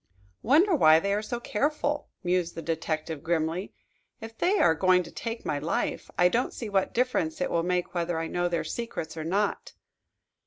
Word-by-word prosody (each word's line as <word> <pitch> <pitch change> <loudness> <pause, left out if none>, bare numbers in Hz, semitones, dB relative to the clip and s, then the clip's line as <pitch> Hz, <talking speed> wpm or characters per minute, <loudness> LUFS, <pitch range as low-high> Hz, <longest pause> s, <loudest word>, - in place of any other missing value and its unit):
"Wonder 330 - +4
why 155 - +6
they 200 +4 -1
are 205 - 0
so 240 +2 -4
careful?" 290 +5 -1
mused 175 -1 0
the 165 - -6
detective 160 -1 -3
grimly. 165 +3 -1 0.5
"If 225 0 -9
they 375 - +2
are 165 - +5
going 180 +2 +3
to 170 - -11
take 230 0 -5
my 145 - -1
life 155 +3 -2
I 180 - +6
don't 235 +7 0
see 225 - -5
what 195 -2 +1
difference 255 +6 0
it 275 - -1
will 170 - +2
make 180 +1 -1
whether 175 -1 -1
I 165 - -2
know 175 +2 -1
their 170 -1 -1
secrets 230 -10 -5
or 160 - -4
not." 195 +5 -1
180 Hz, 190 wpm, -27 LUFS, 165-235 Hz, 0.5 s, why